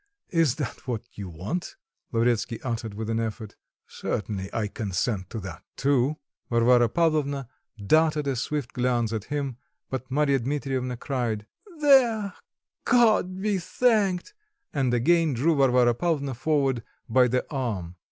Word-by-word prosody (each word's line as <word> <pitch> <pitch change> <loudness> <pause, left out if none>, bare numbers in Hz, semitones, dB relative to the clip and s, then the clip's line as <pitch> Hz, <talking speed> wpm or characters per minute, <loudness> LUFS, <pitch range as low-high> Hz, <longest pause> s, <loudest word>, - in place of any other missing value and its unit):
Is 165 -7 +3
that 140 -1 -5
what 120 -4 -2
you 100 -3 -7
want?" 95 - -4 0.4
Lavretsky 115 0 +1
uttered 115 -4 -3
with 110 +1 -4
an 115 0 0
effort. 110 -1 -4 0.3
"Certainly, 100 -2 -4
I 110 -2 -1
consent 100 -1 -2
to 115 - -5
that 90 -5 -8
too." 140 +1 +2 0.3
Varvara 120 0 +4
Pavlovna 145 -3 +1 0.3
darted 150 +8 +2
a 135 -1 0
swift 140 +1 -3
glance 120 -2 0
at 110 -1 -3
him, 140 -4 -3 0.3
but 130 -1 -4
Marya 140 0 +2
Dmitrievna 130 -1 -2
cried: 120 -5 -2 0.4
"There, 235 -8 +5 0.5
God 215 -6 +3
be 210 -2 +1
thanked!" 205 - +1 0.4
and 135 -4 +1
again 155 +5 +3
drew 155 +7 +2
Varvara 125 -3 +4
Pavlvona 140 -1 -1
forward 135 -1 +1 0.3
by 125 +2 +4
the 125 +1 0
arm. 105 - -3
130 Hz, 135 wpm, -26 LUFS, 115-155 Hz, 0.5 s, There